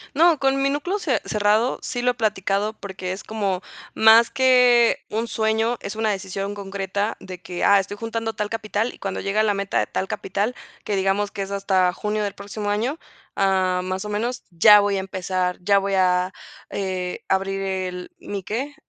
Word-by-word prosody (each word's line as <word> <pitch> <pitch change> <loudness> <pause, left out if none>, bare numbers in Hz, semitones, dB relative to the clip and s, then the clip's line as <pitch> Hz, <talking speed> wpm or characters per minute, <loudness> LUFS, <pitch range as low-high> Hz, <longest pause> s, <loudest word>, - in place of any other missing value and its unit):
No, 330 0 +5
con 270 0 +2
mi 275 - +2
núcleo 325 +8 -1
ce 300 -9 0
cerrado, 215 +4 +2
sí 245 - -3
lo 250 0 +3
he - - -6
platicado 210 -2 0
porque 190 -3 -6
es 190 - -6
como 200 -4 -2 0.3
más 225 +1 +6
que 250 -2 +5
un 225 +2 -2
sueño, 220 +2 0
es 200 - -6
una 220 0 0
decisión 195 0 -3
concreta 200 +1 -3
de 185 -1 -9
que: 175 0 -5
"Ah, 200 0 +6
estoy 200 +2 -5
juntando 225 0 -3
tal 210 -1 -3
capital", 220 +1 -2
y - - -15
cuando 195 -1 -4
llegue 200 +2 -1
a - - +4
la 210 -1 +2
meta 195 0 -2
de - - +1
tal 190 - -3
capital 205 +7 -2 0.3
que 205 - -2
digamos 195 +1 +1
que 200 - -4
es 195 - -8
hasta 190 -2 +1
junio 210 +1 -2
del 200 -1 -2
próximo 205 +1 -5
año, 235 +9 -1 0.4
ah, 190 -2 +2
más 185 +1 -3
o - - -5
menos, 230 +4 -2
ya 210 +5 +7
voy 200 -1 +1
a - - 0
empezar, 185 -1 -2
ya 200 +2 +3
voy 195 0 0
a, 185 0 +2 0.4
eh, 185 -2 -3
abrir 195 0 0
el 185 -2 -4
¿mi 200 -2 -6
que?, 260 +10 -3
205 Hz, 195 wpm, -23 LUFS, 190-225 Hz, 0.4 s, ya